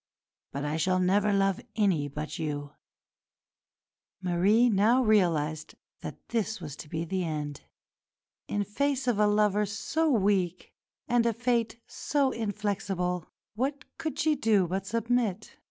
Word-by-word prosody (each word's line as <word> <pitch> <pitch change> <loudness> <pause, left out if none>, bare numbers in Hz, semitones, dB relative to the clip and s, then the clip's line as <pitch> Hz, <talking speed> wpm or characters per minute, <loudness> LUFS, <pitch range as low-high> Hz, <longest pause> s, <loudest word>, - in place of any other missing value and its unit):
But 140 +1 -4
I 150 +2 -1
shall 185 +3 +2
never 200 +3 +3
love 195 +2 +2
any 190 -9 +2
but 150 +3 -6
you." 145 -2 -4 1.5
Marie 190 +6 +3
now 230 +4 +4
realised 165 -8 +1 0.2
that - - -9
this 220 -2 -1
was 150 -5 -7
to 150 - -10
be 160 +2 -3
the 185 +2 -1
end. 150 -3 -4 0.9
In 205 - 0
face 270 +5 -1
of 235 -4 +2
a 210 - +5
lover 210 0 +2
so 305 +10 0
weak, 195 - +1 0.3
and 240 -1 +3
a 230 - +2
fate 235 0 0
so 280 -3 0
inflexible, 195 -5 -2 0.3
what 270 +6 -2
could 320 -1 -3
she 310 0 +3
do 215 -8 +3
but 190 +2 -3
submit? 230 -2 -1
205 Hz, 140 wpm, -28 LUFS, 175-230 Hz, 1.5 s, a